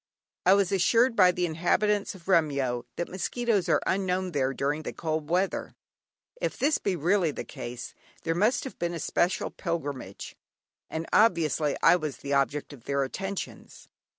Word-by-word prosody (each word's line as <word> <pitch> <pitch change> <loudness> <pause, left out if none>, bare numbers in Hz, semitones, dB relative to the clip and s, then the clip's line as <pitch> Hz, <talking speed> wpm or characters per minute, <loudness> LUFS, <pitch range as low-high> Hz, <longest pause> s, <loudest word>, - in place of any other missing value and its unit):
I 190 - +8
was 200 -3 +2
assured 230 +6 +3
by 185 -4 +6
the 180 0 -1
inhabitants 195 +6 +1
of 175 -2 -15
Remyo 140 -9 +1
that 175 - -2
mosquitos 200 0 -1
are 155 - +3
unknown 185 -1 0
there 135 -4 +1
during 145 +3 -1
the - - -5
cold 155 -2 -3
weather. 185 +3 0 0.7
If - - -1
this 290 +3 +2
be 195 - -1
really 175 +2 +2
the 145 - -5
case, 120 0 -7 0.3
there 165 - 0
must 215 +8 +2
have 265 - -8
been 170 0 -1
a - - -4
special 175 +4 0
pilgrimage, 145 - -5 0.5
and 160 +1 -3
obviously 160 -9 +3
I 180 - +7
was 155 -5 -4
the 140 - -4
object 140 +2 0
of 125 -5 -14
their 140 0 +1
attentions. 195 +8 -6
170 Hz, 165 wpm, -28 LUFS, 145-195 Hz, 0.7 s, I